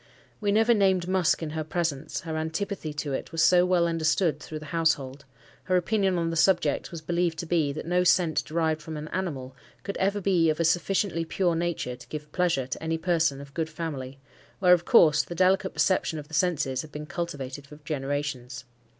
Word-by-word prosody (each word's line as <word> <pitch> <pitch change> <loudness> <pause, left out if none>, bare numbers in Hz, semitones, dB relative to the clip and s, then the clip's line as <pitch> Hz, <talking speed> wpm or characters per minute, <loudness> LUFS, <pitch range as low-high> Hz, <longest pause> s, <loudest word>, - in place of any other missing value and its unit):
We 205 -2 0
never 225 +3 +4
named 190 -4 +2
musk 185 -3 +2
in 155 - -4
her 160 0 -3
presence, 155 -2 -2
her 160 -1 -5
antipathy 160 +2 -3
to 145 -1 -4
it - - -4
was 165 0 +1
so 180 0 +5
well 180 -2 +3
understood 165 -1 +1
through 155 - -7
the 155 - -9
household: 145 -4 0 0.4
her 185 -1 +2
opinion 190 0 +1
on 165 -1 0
the - - -3
subject 175 +2 +2
was 170 -2 -7
believed 170 0 0
to 170 - -4
be, 160 -4 +1
that 155 - -6
no 180 +1 +2
scent 175 -2 +3
derived 160 -1 -1
from 155 0 -7
an 150 +1 -6
animal 135 -9 -4 0.3
could 200 - -4
ever 200 +2 +1
be 180 -4 +2
of 155 - -1
a 165 - +2
sufficiently 175 0 +1
pure 175 +1 0
nature 165 -7 -2
to 125 - -15
give 150 -1 -7
pleasure 175 -7 +1
to 130 - -6
any 160 0 -1
person 165 -4 +1
of 140 0 -11
good 160 0 -2
family, 140 -6 -5 0.4
where, 180 -2 +5
of 175 -1 +2
course, 150 -2 +6
the 175 - -8
delicate 185 +2 +3
perception 185 -4 +1
of 150 -1 -7
the - - -16
senses 150 -6 +1
had 155 - -12
been 150 +1 -6
cultivated 145 -5 -5
for 150 - -12
generations. 135 -4 -3
165 Hz, 205 wpm, -27 LUFS, 150-180 Hz, 0.4 s, course